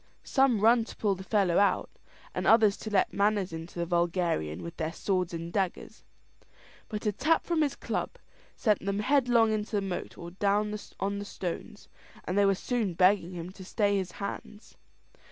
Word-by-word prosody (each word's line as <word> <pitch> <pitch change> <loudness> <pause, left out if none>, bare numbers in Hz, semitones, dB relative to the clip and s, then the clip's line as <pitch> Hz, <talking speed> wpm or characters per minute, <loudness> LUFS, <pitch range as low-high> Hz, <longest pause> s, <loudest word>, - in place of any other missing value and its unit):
Some 265 -6 +2
run 230 +2 +5
to - - -10
pull 205 -2 +1
the 190 0 -7
fellow 190 -4 +2
out, 200 - +2 0.5
and - - -2
others 220 -3 +6
to 215 - -6
let 200 -3 +2
manners 200 -3 +1
into 165 +2 -8
the 170 - -1
vulgarian 170 - 0
with 170 0 -8
their 160 0 -2
swords 185 0 -1
and 170 0 -6
daggers; 190 -3 -3 0.9
but 210 -1 -5
a 210 - +3
tap 305 +11 +1
from 335 -2 +1
his 285 -2 +1
club - - -3 0.4
sent 210 -6 +1
them 200 0 -1
headlong 245 -3 +3
into 215 0 -2
the - - +3
moat 190 -2 -5
or 170 0 -8
down 205 +3 0 0.2
on 200 +1 -1
the 205 - -5
stones, 195 +2 -6 0.4
and 180 - -2
they 200 0 +4
were 195 - +3
soon 215 -4 -2
begging 185 0 +3
him 175 +1 -6
to 190 0 -11
stay 205 +1 +1
his 190 -2 -2
hands. 205 +1 -7
200 Hz, 185 wpm, -29 LUFS, 180-215 Hz, 0.9 s, others